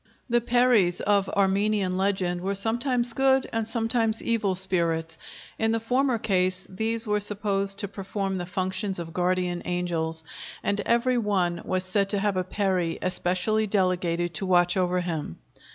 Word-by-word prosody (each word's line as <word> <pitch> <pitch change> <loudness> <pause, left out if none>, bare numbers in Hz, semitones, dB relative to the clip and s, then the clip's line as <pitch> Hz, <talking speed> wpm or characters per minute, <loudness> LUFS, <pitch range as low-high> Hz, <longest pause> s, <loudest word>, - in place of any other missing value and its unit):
The 240 0 +4
peris 235 -7 +3
of 200 -1 +2
Armenian 200 -1 +1
legend 185 -2 0
were 195 +2 -2
sometimes 240 +3 +1
good 265 0 +3
and 225 -1 -1
sometimes 225 -1 0
evil 215 -5 0
spirits; 170 -3 0 0.4
in 225 0 +2
the 225 - +1
former 250 +2 +1
case 185 -3 0
these 220 +4 -2
were 210 -1 +1
supposed 200 -1 -1
to 200 - -2
perform 195 -1 -3
the 175 - -5
functions 190 +1 -2
of 165 -1 -6
guardian 180 0 0
angels, 165 -2 -2 0.4
and 205 0 0
every 240 +1 +2
one 185 -6 0
was 185 0 -1
said 195 +1 0
to 205 - +1
have 205 -1 0
a 185 - 0
peri 185 -3 -1
especially 185 +4 +1
delegated 180 -3 0
to 195 - -3
watch 175 -1 +3
over 180 -1 +1
him. 160 - -4
195 Hz, 155 wpm, -26 LUFS, 180-220 Hz, 0.4 s, The